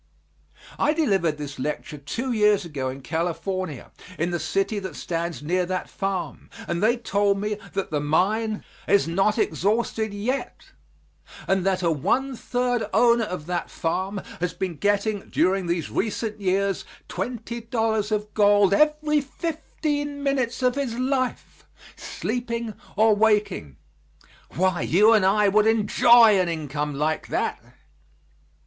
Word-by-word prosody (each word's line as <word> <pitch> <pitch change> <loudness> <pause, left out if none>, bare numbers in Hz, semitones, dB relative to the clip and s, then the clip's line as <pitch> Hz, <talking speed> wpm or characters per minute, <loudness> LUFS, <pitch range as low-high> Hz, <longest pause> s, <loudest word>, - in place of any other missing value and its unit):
I 300 - +3
delivered 195 - +1
this 145 -2 -7
lecture 150 +2 -4
two 230 - -4
years 210 -4 +3
ago 140 -5 -3
in 135 +1 -7
California, 170 0 -3 0.3
in 170 +2 -1
the 175 - -1
city 195 +6 -1
that 190 -5 -7
stands 170 -2 -4
near 180 +4 +1
that 185 0 -3
farm, 195 -2 -4 0.2
and 170 +1 -2
they 230 +4 +3
told 200 -3 +1
me 210 +1 -2
that 195 -1 -3
the 150 - 0
mine 210 +9 0 0.2
is 200 -4 +3
not 195 +6 +1
exhausted 220 +1 0
yet, 225 +7 -4 0.8
and 190 -1 +2
that 190 -1 +1
a 170 - +3
one 260 - 0
third 245 -1 -1
owner 235 -1 +4
of 180 -6 -6
that 175 0 -3
farm 190 +4 -2 0.2
has 180 0 -2
been 180 -4 -3
getting 205 +1 0
during 185 0 +1
these 170 -1 -2
recent 215 0 -2
years 195 0 0 0.2
twenty 235 +4 -5
dollars 225 -2 -1
of 210 0 -2
gold 205 -2 +4
every 300 +3 +3
fifteen 290 -1 -4
minutes 260 -3 0
of 250 0 +3
his 265 -4 -3
life, 255 0 -2 0.3
sleeping 235 -2 -4 0.2
or 215 +1 +4
waking. 210 - +1 0.8
Why, 185 -2 +1
you 210 +7 +5
and 215 -3 +4
I 205 +1 +4
would 210 +2 +4
enjoy 225 0 +6
an 180 -2 +1
income 150 -2 -3
like 155 +2 -1
that! - - -2
205 Hz, 140 wpm, -24 LUFS, 175-230 Hz, 0.8 s, enjoy